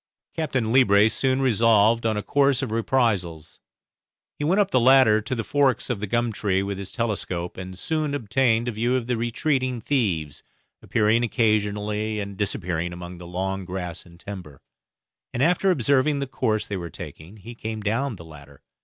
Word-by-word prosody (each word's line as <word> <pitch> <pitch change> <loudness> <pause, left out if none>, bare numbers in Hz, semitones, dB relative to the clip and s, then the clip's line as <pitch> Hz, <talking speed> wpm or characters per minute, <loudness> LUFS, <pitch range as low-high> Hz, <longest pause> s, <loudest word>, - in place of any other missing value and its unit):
Captain 130 -8 -1
Leebrace 110 -4 +5
soon 130 0 +1
resolved 115 -1 +3
on 110 -1 0
a 105 - -3
course 140 -2 +2
of 125 - -4
reprisals. 105 -9 -1 0.8
He - - -2
went 180 +7 +2
up 200 -1 +2
the 130 - +4
ladder 125 -3 +5
to 110 +4 -3
the 115 - -2
forks 140 -1 +1
of 115 - -2
the 105 - -4
gum 120 +3 0
tree 100 -2 0
with 100 -1 -4
his 95 -1 -6
telescope, 95 -7 -3
and 95 0 -8
soon 155 - -1
obtained 120 -1 +1
a - - 0
view 120 +3 0
of 125 -3 -1
the 125 0 -1
retreating 125 +2 -1
thieves, 100 - -1 0.4
appearing 110 +2 +2
occasionally 105 -2 0
and 100 -1 -5
disappearing 90 -4 -2
among 90 0 -9
the 85 - -10
long 95 +2 -3
grass 90 -2 -5
and 85 -1 -18
timber; 90 -9 -9 0.7
and 125 - +1
after 180 +4 +3
observing 140 -1 +2
the 140 - -2
course 110 -5 -1
they 100 - -4
were 85 -2 -6
taking 85 +6 -10
he 110 +4 -10
came 110 -1 -5
down 115 +5 -1
the 85 -3 -12
ladder. 70 -3 -15
110 Hz, 180 wpm, -24 LUFS, 95-130 Hz, 0.8 s, Leebrace